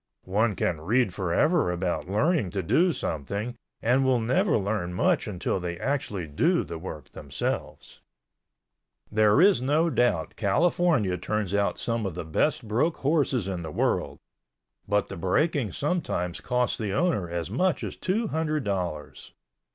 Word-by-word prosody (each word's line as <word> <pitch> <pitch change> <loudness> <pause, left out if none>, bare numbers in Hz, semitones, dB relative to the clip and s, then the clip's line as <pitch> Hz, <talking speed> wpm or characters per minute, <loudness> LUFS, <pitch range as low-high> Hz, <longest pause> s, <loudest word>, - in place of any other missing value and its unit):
One 105 +3 +1
can 80 -3 -1
read 110 +3 +1
forever 95 - +2
about 90 0 -2
learning 140 - +1
to 95 - 0
do 155 - +3
something 100 - -3 0.3
and 125 +4 +3
will 130 -2 +3
never 155 - +2
learn 100 -4 -2
much - - +2
until 95 -1 -2
they 85 -1 -4
actually 125 -10 -2
do 165 - +1
the 85 - -7
work 80 -5 -8
themselves. - - -5 1.1
There 105 +2 +4
is 190 -4 +5
no 155 +6 +2
doubt 120 - +1
California 115 - +2
turns 105 0 -2
out 100 -3 +1
some 115 -3 -1
of 90 - -6
the 90 - -5
best 115 - 0
broke 125 +10 +1
horses 140 - +1
in 95 -3 -3
the 80 - -5
world, - - 0 0.7
but 105 0 +1
the - - -7
breaking 115 - +1
sometimes 140 - -2
costs 125 -1 0
the 105 -4 -2
owner 105 - +1
as 85 +1 -4
much 180 - +1
as - - -4
two 210 +5 -1
hundred 155 -2 -1
dollars. 90 -7 -4
105 Hz, 150 wpm, -26 LUFS, 90-145 Hz, 1.1 s, is